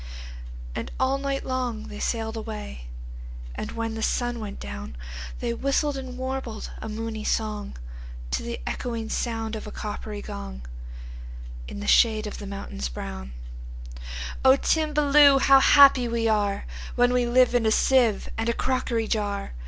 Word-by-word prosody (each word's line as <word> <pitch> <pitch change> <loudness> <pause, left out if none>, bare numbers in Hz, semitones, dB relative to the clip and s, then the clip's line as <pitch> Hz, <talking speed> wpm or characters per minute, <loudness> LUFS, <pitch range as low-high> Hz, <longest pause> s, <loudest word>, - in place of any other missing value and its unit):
And - - -4
all 265 +1 +2
night 275 0 -2
long 250 -4 -2
they 210 - -8
sail'd 225 -1 -1
away; 70 - -6 0.7
And, - - -5
when 230 -1 -2
the 225 - -4
sun 240 +1 0
went 210 -2 -6
down, 70 -2 -7 0.4
They 235 -1 -1
whistled 275 +3 0
and 260 -2 -6
warbled 260 -4 -4
a 220 - -5
moony 220 0 -4
songTo 215 -2 -2 0.6
the - - -5
echoing 230 -2 -3
sound 225 -2 -2
of 215 - -6
a - - -7
coppery 210 0 -5
gong, 65 -2 -7 1.0
In 65 +1 -6
the - - -5
shade 220 - +5
of 210 - -6
the 205 - -7
mountains 130 - -5
brown,"O - - -3
Timballoo! 295 -2 +5
how 270 0 +7
happy 275 -3 +7
we 230 -1 -1
areWhen 215 +3 0
we 250 -1 +2
live 250 +1 +4
in 235 -2 +3
a - - +3
sieve 240 -4 +3
and 225 +1 0
a - - +2
crockery 240 -3 0
jar! 205 - -1
225 Hz, 145 wpm, -26 LUFS, 200-255 Hz, 1.0 s, how